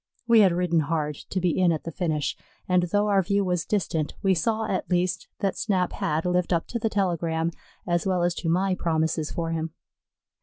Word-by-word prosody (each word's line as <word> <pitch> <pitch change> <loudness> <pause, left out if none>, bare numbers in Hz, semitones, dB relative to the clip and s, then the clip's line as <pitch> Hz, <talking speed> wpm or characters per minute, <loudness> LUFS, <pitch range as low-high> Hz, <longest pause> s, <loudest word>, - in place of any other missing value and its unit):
We 230 -1 +6
had 195 -4 +6
ridden 170 -1 +1
hard 150 -1 -1 0.2
to 190 - -1
be 180 -2 +1
in 180 -2 +5
at 160 - -2
the 165 - -5
finish, 155 -3 -1 0.3
and 180 -1 +3
though 205 +4 +1
our 200 -2 +4
view 200 +2 +1
was 180 -2 0
distant, 165 -7 -1
we 195 -1 +4
saw 220 +6 0
at 190 -3 -2
least 180 0 0
that 195 -1 0
Snap 185 -4 0
had 155 +2 -1
lived 180 0 +1
up 170 -2 +1
to 235 - -2
the 225 - 0
telegram, 170 -5 0 0.3
as 175 0 0
well 180 -2 +1
as 175 0 +2
to 165 - -2
my 185 +3 +2
promises 160 -3 0
for 165 -1 -3
him. 160 0 -3
175 Hz, 205 wpm, -26 LUFS, 165-190 Hz, 0.3 s, We